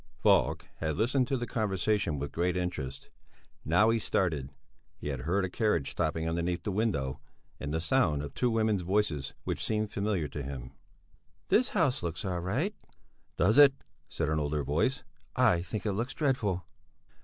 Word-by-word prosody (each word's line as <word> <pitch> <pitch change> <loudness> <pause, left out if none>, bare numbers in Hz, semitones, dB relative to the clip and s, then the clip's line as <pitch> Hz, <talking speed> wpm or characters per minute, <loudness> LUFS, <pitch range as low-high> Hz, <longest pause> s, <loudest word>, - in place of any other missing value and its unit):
Falk - - +3
had 80 -2 -2
listened 125 +4 +2
to 135 - 0
the 120 - -3
conversation 105 -6 0
with 70 0 -4
great 90 +3 0
interest. 75 -7 -4 0.5
Now 100 +9 +4
he 115 - +2
started; 80 -10 0 0.5
he - - -5
had 70 -3 -3
heard 95 +7 +1
a - - -1
carriage 90 - 0
stopping 80 0 -1
underneath 85 +1 -1
the 105 - -2
window, 95 - -1 0.4
and 75 - -4
the 80 - 0
sound 80 - +2
of 70 - -7
two 125 - +1
women's 110 -3 +1
voices 90 -7 0
which - - -2
seemed 110 -1 0
familiar 100 -6 -1
to 75 - -5
him. 65 -2 -6 0.8
"This 250 +2 +4
house 160 -10 +1
looks 85 +4 -4
all 90 -2 -1
right." 125 - -1 0.6
"Does 105 - +4
it?" 140 -2 +8 0.3
said 80 - -2
an 75 0 +1
older 75 0 -1
voice. 80 - 0 0.3
"I 115 -9 +4
think 100 +2 -5
it 105 - +1
looks 120 +5 -3
dreadful." 115 - 0
90 Hz, 170 wpm, -30 LUFS, 75-110 Hz, 0.8 s, it